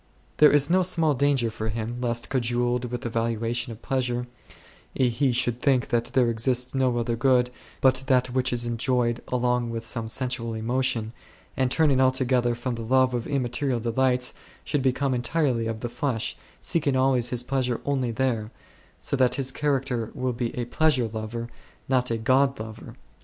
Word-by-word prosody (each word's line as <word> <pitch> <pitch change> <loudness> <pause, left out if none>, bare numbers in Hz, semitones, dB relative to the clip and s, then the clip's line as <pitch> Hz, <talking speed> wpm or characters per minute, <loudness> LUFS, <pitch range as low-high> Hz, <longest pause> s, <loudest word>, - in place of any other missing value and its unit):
There 150 - +7
is 145 -1 +4
no 185 +3 +3
small 165 -4 +2
danger 135 -4 +1
for 110 0 -4
him 115 +2 -4
lest, 120 -1 -2
cajoled 120 -1 0
in - - -5
the 120 - -3
valuation 115 +1 -2
of 115 0 -11
pleasure, 125 -2 -1 0.7
he 130 +1 +2
should 120 0 0
think 135 -4 +2
that 120 -1 +1
there 125 -2 +2
exists 125 +2 +1
no 130 -2 +1
other 120 0 -1
good 125 0 +2 0.3
but 130 0 +3
that 125 -2 +2
which 130 0 +1
is 120 -1 -1
enjoyed 120 0 0
along 125 -1 0
with 115 0 -4
some 115 -1 -2
sensual 115 -1 -2
emotion, 115 0 -1 0.4
and, 130 -1 +1
turning 140 -1 +3
alto 130 0 +3
gether 120 -1 +2
from 120 +1 -3
the 115 - -5
love 130 +2 +3
of 120 -2 -2
immaterial 130 -2 -1
delights, 125 +2 +1 0.3
should 145 - -1
become 130 +1 +1
entirely 125 -2 0
of 115 0 -4
the 120 - -2
flesh, 125 -3 -2 0.3
seeking 145 -5 0
always 130 -2 +2
his 125 -1 -2
pleasure 125 -2 -1
only 135 -3 0
there, 115 -3 -1 0.5
so - - -1
that 130 -2 +3
his 135 -1 -1
char 145 -1 +1
acter 125 -4 -4
will 130 -2 -1
be 120 0 -2
a 120 - -1
Pleasure 130 -1 +2
lover, 110 +2 -5 0.4
not 130 -1 +1
a 115 - 0
God 130 +3 +2
lover. 110 0 -8
125 Hz, 180 wpm, -25 LUFS, 115-130 Hz, 0.7 s, There